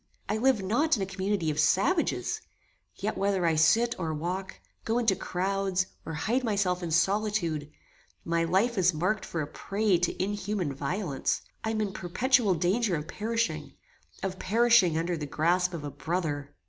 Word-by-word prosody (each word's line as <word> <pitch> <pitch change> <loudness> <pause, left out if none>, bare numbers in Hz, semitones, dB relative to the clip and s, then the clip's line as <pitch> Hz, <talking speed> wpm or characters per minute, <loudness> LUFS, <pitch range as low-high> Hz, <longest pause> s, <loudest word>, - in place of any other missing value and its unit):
I 210 - 0
live 245 -3 +2
not 275 +9 +2
in 200 - -1
a - - -1
community 190 -3 -1
of 150 - -3
savages; 315 - +1 0.5
yet, 215 +2 -3
whether 195 -2 +1
I 165 - +3
sit 220 +10 +4
or 160 -3 -2
walk, 180 +5 -4 0.2
go 225 +1 0
into 225 -5 +3
crouds, 190 +1 -1 0.2
or 160 - -4
hide 235 +11 0
myself 200 -5 0
in 175 - -3
solitude, 175 -3 +1 0.6
my 170 0 +1
life 195 +7 +1
is 180 -2 +3
marked 185 +6 0
for 165 -2 -3
a - - -5
prey 195 +3 0
to 175 - -1
inhuman 200 -4 -2
violence; 145 +1 -2 0.2
I 220 - -1
am 220 -1 0
in 200 -2 -2
perpetual 220 +2 +2
danger 190 +4 +1
of 150 0 -4
perishing; 230 +4 -2 0.5
of 190 -1 -3
perishing 225 -6 +4
under 170 +2 0
the 150 -2 -5
grasp 175 +5 +1
of 170 -4 -6
a 145 - -5
brother! 155 -5 -3
190 Hz, 170 wpm, -28 LUFS, 170-215 Hz, 0.6 s, sit